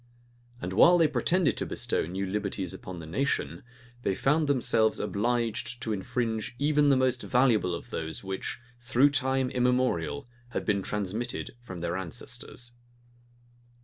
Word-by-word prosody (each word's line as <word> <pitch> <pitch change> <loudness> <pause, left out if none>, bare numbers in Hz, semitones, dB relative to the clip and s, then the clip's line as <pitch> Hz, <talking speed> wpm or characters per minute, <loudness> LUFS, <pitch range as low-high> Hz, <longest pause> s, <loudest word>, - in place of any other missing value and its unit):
And 90 -2 -4
while 175 - +7
they 165 -2 +5
pretended 150 +3 +2
to - - -1
bestow - - -1
new 95 +3 -3
liberties 100 -2 -2
upon 95 -1 -8
the 85 - -7
nation, 135 - -1 0.4
they 95 - 0
found 150 +6 +2
themselves 115 -5 +3
obliged 120 +3 -1
to 110 - -1
infringe 110 +3 -2
even 145 +1 +3
the 140 - +6
most 130 -1 +2
valuable 115 -8 +3
of - - -9
those 80 +3 -4
which, 95 0 -4 0.2
through 125 +4 +3
time 130 -2 +1
immemorial, 125 - +1 0.3
had - - -2
been 100 -2 +1
transmitted 105 +5 -3
from 95 -8 -8
their 85 0 -1
ancestors. 95 +6 -5
120 Hz, 145 wpm, -28 LUFS, 95-130 Hz, 0.4 s, while